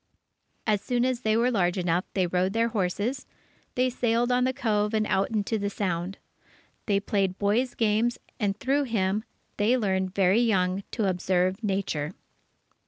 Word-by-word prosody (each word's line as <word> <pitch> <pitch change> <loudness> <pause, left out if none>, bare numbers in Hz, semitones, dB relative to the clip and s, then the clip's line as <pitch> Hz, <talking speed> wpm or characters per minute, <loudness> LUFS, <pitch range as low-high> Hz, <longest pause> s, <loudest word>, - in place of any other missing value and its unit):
As 210 -2 +2
soon 245 +2 0
as 255 -2 0
they 220 -2 +2
were 240 +2 +3
large 180 -5 +1
enough, 175 0 0
they 190 -2 +2
rode 180 +2 0
their 230 +1 +2
horses, 215 +5 -2 0.5
they 255 +1 +3
sailed 240 0 +1
on 250 0 +3
the 260 - +2
Cove 210 -3 0
and 215 0 +2
out 195 -1 +1
into 220 0 -1
the 200 0 -1
Sound. 185 -2 -2 0.7
They 200 -2 +3
played 195 -2 0
boys' 225 +5 +1
games, 225 +2 +1 0.2
and 200 -2 0
through 280 +3 +1
him, 210 -3 0 0.3
they 220 +5 +3
learned 190 -4 -1
very 195 +3 +4
young 190 -4 +1
to 220 -4 0
observe 185 +2 0
nature. 190 -6 -1
205 Hz, 165 wpm, -27 LUFS, 190-230 Hz, 0.7 s, very